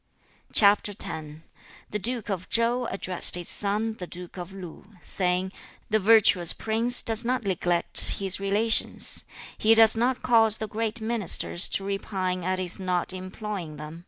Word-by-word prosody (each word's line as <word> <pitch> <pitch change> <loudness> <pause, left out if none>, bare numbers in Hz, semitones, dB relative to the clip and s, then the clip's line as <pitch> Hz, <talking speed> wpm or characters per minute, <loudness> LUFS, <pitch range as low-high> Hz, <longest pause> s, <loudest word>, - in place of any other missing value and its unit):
CHAP. 205 0 +3
X. 155 -1 -7 0.6
The 210 - -3
duke 235 0 -2
of 185 -2 -6
Chau 235 +2 0
addressed 185 -5 +2
his 175 -1 -4
son, 215 +2 +1
the 180 - -7
duke 180 0 -10
of 180 0 -9
Lu, 190 +2 -12
saying, 180 0 -3 0.4
'The 215 - +2
virtuous 200 -5 +4
prince 230 +3 +2
does 225 -1 +4
not 250 +1 -2
neglect 175 -3 0 0.2
his 195 -1 -1
relations. 205 +3 -1 0.3
He 225 +1 +3
does 225 -1 +7
not 245 +3 -2
cause 225 -3 +3
the 220 - -6
great 225 +2 -4
ministers 220 -5 +1
to 195 - -10
repine 190 -2 -4
at 185 +1 -2
his 185 0 +2
not 180 -1 -3
employing 185 -3 -8
them. 155 +2 -10
200 Hz, 155 wpm, -24 LUFS, 180-225 Hz, 0.6 s, does